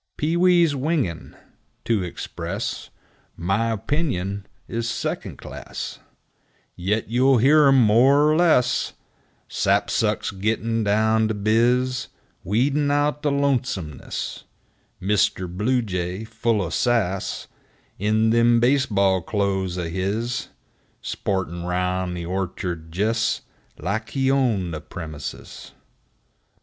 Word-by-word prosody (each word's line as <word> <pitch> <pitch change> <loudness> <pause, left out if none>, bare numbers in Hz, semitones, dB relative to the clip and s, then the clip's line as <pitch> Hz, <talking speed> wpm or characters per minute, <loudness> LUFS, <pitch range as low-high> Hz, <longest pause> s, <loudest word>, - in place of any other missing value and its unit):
5 - - -53
Pee 155 +3 0
wees' 175 -2 +4
singin', 135 - -2 0.5
to 115 -4 +1
express 90 -2 -5 0.5
My 95 +6 0
opinion, 100 - -2 0.2
's 115 0 -3
second - - -3
class, - - -7 0.8
Yit 105 +5 -1
you'll 125 +4 +4
hear 145 +5 +6
'em 135 -1 +6
more 130 +7 +5
er - - +3
less; 155 -8 +3 0.5
Sapsucks - - +1
gittin' 110 +3 -1
down 110 +2 +2
to 110 - -2
biz, 120 +5 +2 0.4
Weedin' 140 - +1
out 145 +1 +1
the 150 - +1
lonesomeness; 125 - -2 0.5
Mr. 95 -1 +1
Bluejay, 95 -2 -1
full 110 -2 0
o' 85 - -4
sass, 105 -6 0 0.5
In 110 +2 +2
them 115 0 +4
base 130 +2 +3
ball 95 -3 +2
clothes 95 -1 -1
o' 90 -2 -2
his, 100 +7 -2 0.6
Sportin' 90 -3 -2
round 90 0 -1
the 85 - -5
orchard 90 -2 -4
jes' 115 +3 +1 0.4
Life 110 +4 -3
he 135 -1 +1
owned 110 -11 +1
the 75 - -5
premises! 80 -2 -8
110 Hz, 110 wpm, -23 LUFS, 95-130 Hz, 0.8 s, hear